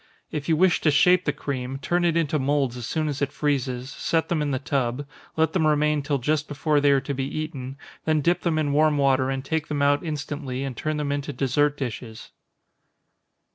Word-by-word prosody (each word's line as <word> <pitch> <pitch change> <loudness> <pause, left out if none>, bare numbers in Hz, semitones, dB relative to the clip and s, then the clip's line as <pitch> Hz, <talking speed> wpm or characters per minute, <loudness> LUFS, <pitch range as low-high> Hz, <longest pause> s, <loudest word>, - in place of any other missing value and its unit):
If 150 0 -4
you 160 - +4
wish 180 +2 +3
to 155 - +3
shape 180 +5 +4
the 150 - +2
cream, 135 -2 -4
turn 175 +6 0
it 170 -1 +2
into 155 -2 +1
moulds 135 -2 +1
as 120 -2 -6
soon 155 +2 -1
as 145 -1 -3
it 140 - 0
freezes, 130 -3 -1
set 165 +1 -1
them 165 -3 +1
in 150 - 0
the 135 - 0
tub, 130 0 -1 0.3
let 160 0 +2
them 160 -4 +2
remain 150 0 +2
till 140 0 0
just 150 +4 0
before 145 0 +1
they 145 - +4
are 140 -1 +4
to 140 +2 -4
be 135 0 -2
eaten, 140 -3 -5 0.3
then 155 -1 +2
dip 175 +5 +2
them 165 -3 0
in 145 -2 0
warm 155 0 +3
water, 135 -1 +3
and 135 0 -3
take 160 +1 -1
them 145 -2 -1
out 145 0 +3
instantly, 145 -4 -4
and 135 -2 -4
turn 155 +5 -2
them 145 -1 -2
into 145 0 -2
dessert 145 +2 +1
dishes. 120 -4 -6
145 Hz, 215 wpm, -25 LUFS, 135-155 Hz, 0.3 s, you